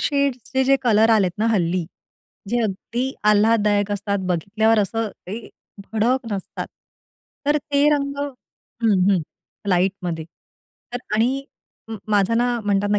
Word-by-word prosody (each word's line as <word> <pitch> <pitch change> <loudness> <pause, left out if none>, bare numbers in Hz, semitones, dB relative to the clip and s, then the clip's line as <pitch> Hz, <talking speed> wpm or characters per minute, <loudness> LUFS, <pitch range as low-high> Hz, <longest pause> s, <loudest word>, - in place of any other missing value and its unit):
शेड्सचे 265 -3 0
जे 275 +1 +5
कलर 225 -2 +4
आलेत 200 -5 +4
ना 220 - +2
हल्ली. 175 -2 +1 0.6
जे 240 +3 +1
अगदी 235 +6 -2 0.2
आल्हाददायक 210 -1 +3
असतात, 200 0 -1
बघितल्यावर 215 +6 +2
असं 220 +2 0 0.2
ते 215 +5 -6 0.4
भडक 240 +4 +1
नसतात. 195 -1 -4 0.8
तर 295 +1 +4
ते 285 0 +1
रंग 280 -1 -2
हं, 230 -7 -1
हं. 190 -3 +3 0.5
लाईटमध्ये 180 -3 0 0.7
तर 245 - -2 0.2
आणि 255 +5 +1 0.4
म 225 - -5
माझं 205 +2 +3
ना 245 0 +1
म्हणतात 205 0 +1
ना, 205 - +3
220 Hz, 130 wpm, -22 LUFS, 200-245 Hz, 0.8 s, जे